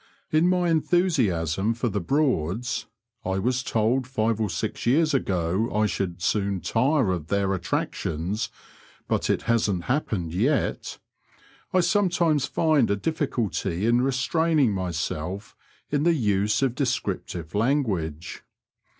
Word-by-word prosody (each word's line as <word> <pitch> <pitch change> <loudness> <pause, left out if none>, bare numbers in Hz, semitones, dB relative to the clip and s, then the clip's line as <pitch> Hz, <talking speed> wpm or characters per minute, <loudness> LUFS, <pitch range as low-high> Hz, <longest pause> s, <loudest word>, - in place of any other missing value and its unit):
In 155 +3 +4
my 180 -1 +2
enthusiasm 115 - +1
for 120 +1 -1
the 105 -3 -1
Broads 125 - 0 0.4
(I 95 +1 -1
was 125 +6 0
told 120 +3 0
five 110 -3 0
or 105 - 0
six 90 - -3
years 155 +5 +3
ago 95 -2 0
I 105 0 +2
should 90 -4 -3
soon 100 0 0
tire 130 - +1
of 85 -4 -3
their 100 +1 +1
attractions, 90 +2 -2 0.6
but - - 0
it - - +1
hasn't 105 -6 +1
happened 105 - -1
yet) 130 - 0 0.7
I 185 - +4
sometimes 170 -5 +2
find 155 -6 +2
a 100 - +2
difficulty 105 - -2
in 120 +1 +3
restraining 135 +1 +2
myself 90 0 -3 0.4
in 145 -1 +1
the 170 +2 +3
use 105 -1 +1
of 130 -3 +1
descriptive 115 - -3
language. 100 - -1
115 Hz, 125 wpm, -25 LUFS, 95-140 Hz, 0.7 s, In